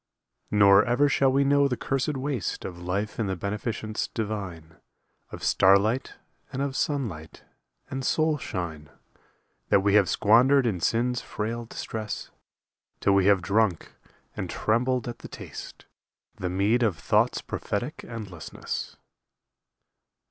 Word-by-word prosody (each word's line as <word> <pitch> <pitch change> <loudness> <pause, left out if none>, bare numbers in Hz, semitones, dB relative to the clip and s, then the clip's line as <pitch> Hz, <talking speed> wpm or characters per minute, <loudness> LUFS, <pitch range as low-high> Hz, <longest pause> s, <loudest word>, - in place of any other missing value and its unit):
Nor 100 -1 +6
ever 125 +5 +3
shall 135 -1 +3
we 140 +1 +3
know 140 0 +4
the 125 -3 -2
cursed 135 +1 -1
waste 130 -7 -3
Of 85 -2 -7
life 100 +5 -3
in 110 - 0
the 95 - -1
beneficence 105 +3 -3
divine 100 -8 -5 0.5
Of - - -9
starlight 100 +6 +3 0.4
and 135 - -4
of 140 -1 -3
sunlight 115 - -3 0.4
and 135 0 -4
soul 155 +2 +1
shine 80 - -5 0.8
That 100 - +5
we 100 0 +2
have 100 -3 +5
squandered 125 +5 +5
in 105 -7 0
sin's 120 +7 +1
frail 115 +2 -4
distress, 110 -1 -5 0.7
Till 100 - +3
we 100 -1 +4
have 100 -3 +4
drunk, 100 -3 +1 0.4
and - - -4
trembled 125 +2 0
at 120 -1 -6
the - - -9
taste, - - -9 0.5
The 90 - -3
mead 100 +6 +2
of 105 -8 +1
Thought's - - +2
prophetic 120 +8 -4
endlessness. 100 -8 -6
110 Hz, 135 wpm, -26 LUFS, 100-125 Hz, 0.8 s, Nor